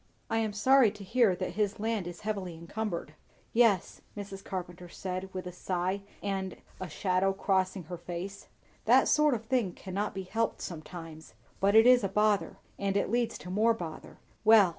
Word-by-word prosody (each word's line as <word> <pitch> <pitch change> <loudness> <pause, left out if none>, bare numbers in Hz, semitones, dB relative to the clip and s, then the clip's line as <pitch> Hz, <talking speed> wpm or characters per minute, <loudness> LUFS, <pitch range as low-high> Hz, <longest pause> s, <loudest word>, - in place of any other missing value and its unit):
"I 225 - +2
am 220 -2 0
sorry 260 +3 +5
to 205 0 -10
hear 225 -1 +3
that 180 - -3
his 210 +2 -1
land 220 -4 -1
is 175 -1 -8
heavily 195 -5 -3
encumbered." 170 -1 -4 0.4
"Yes!" 225 -6 +3 0.2
Mrs. 195 -1 -7
Carpenter 180 -1 -6
said 185 +1 -5
with 185 -1 -5
a 180 - -5
sigh, 185 +2 -2 0.2
and 195 -2 -2 0.2
a 185 - -5
shadow 185 +3 +1
crossing 190 -1 0
her 175 +3 -7
face. 185 +3 -6 0.4
"That - - +6
sort 300 -3 +4
of 225 0 -6
thing 225 -7 +1
cannot 195 +2 -4
be 190 - -3
helped 225 +4 -1
sometimes, 160 -1 -8 0.2
but 200 +2 +3
it 225 +1 +8
is 250 -2 +7
a 195 - 0
bother, 210 +1 +2 0.2
and 200 0 0
it 200 - 0
leads 240 -1 +1
to 180 - -8
more 225 +4 +3
bother. 165 -7 -8 0.3
Well! 215 -4 +7
195 Hz, 180 wpm, -30 LUFS, 180-220 Hz, 0.4 s, it